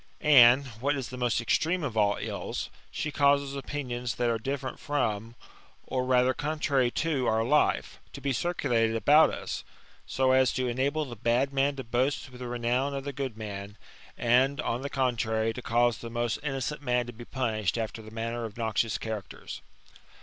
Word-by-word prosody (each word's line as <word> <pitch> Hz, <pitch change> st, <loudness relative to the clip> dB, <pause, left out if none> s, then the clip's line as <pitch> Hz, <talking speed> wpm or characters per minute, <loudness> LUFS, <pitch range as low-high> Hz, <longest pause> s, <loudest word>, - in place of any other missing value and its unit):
And, 135 Hz, -2 st, +7 dB, 0.2 s
what 145 Hz, +2 st, +1 dB
is 135 Hz, -4 st, -4 dB
the 130 Hz, -, -7 dB
most 120 Hz, -3 st, +1 dB
extreme 160 Hz, +9 st, +1 dB
of 130 Hz, -6 st, -3 dB
all 105 Hz, -2 st, +3 dB
ill^ -, -, -4 dB, 0.2 s
she 155 Hz, -, -3 dB
causes 140 Hz, -1 st, +2 dB
opinions 125 Hz, -4 st, -4 dB
that 120 Hz, -1 st, +1 dB
are 115 Hz, -, -1 dB
different 130 Hz, +2 st, -4 dB
from, 115 Hz, -6 st, -2 dB, 0.5 s
or 130 Hz, -1 st, -1 dB
rather 125 Hz, 0 st, +3 dB
contrary 145 Hz, -4 st, 0 dB, 0.2 s
to 140 Hz, -6 st, 0 dB
our 110 Hz, 0 st, +2 dB
life, 150 Hz, +6 st, +1 dB
to -, -, -7 dB
be 140 Hz, 0 st, -1 dB
circulated 120 Hz, -8 st, +1 dB
about 150 Hz, +7 st, +6 dB
us: -, -, -5 dB, 0.4 s
so 130 Hz, 0 st, +2 dB
as 130 Hz, -1 st, +4 dB
to 130 Hz, -1 st, -1 dB
enable 140 Hz, +5 st, 0 dB
the 120 Hz, -3 st, -8 dB
bad 120 Hz, +5 st, +1 dB
man 140 Hz, +1 st, +2 dB
to 135 Hz, -, -5 dB
boast 130 Hz, +4 st, -1 dB
with 125 Hz, -, -12 dB
the 125 Hz, -, -4 dB
renown 120 Hz, +3 st, 0 dB
of 135 Hz, -, -4 dB
the 140 Hz, 0 st, -5 dB
good 135 Hz, -5 st, -4 dB
man, 100 Hz, -1 st, -7 dB, 0.4 s
and, 130 Hz, +4 st, +3 dB
on 120 Hz, -4 st, -2 dB
the 140 Hz, -, -4 dB
contrary, 115 Hz, -4 st, 0 dB
to 125 Hz, -, -7 dB
cause 120 Hz, 0 st, +2 dB
the 115 Hz, -, -7 dB
most 120 Hz, -1 st, -1 dB
innocent 140 Hz, 0 st, -3 dB
man 125 Hz, -3 st, +1 dB
to 120 Hz, -, -8 dB
be 120 Hz, +2 st, -10 dB
punished 110 Hz, -6 st, -1 dB
after 115 Hz, 0 st, -3 dB
the 110 Hz, -, -11 dB
manner 115 Hz, +1 st, -4 dB
of 110 Hz, -1 st, -7 dB
noxious 110 Hz, -1 st, 0 dB
characters. 110 Hz, -3 st, -6 dB
125 Hz, 185 wpm, -28 LUFS, 115-140 Hz, 0.5 s, And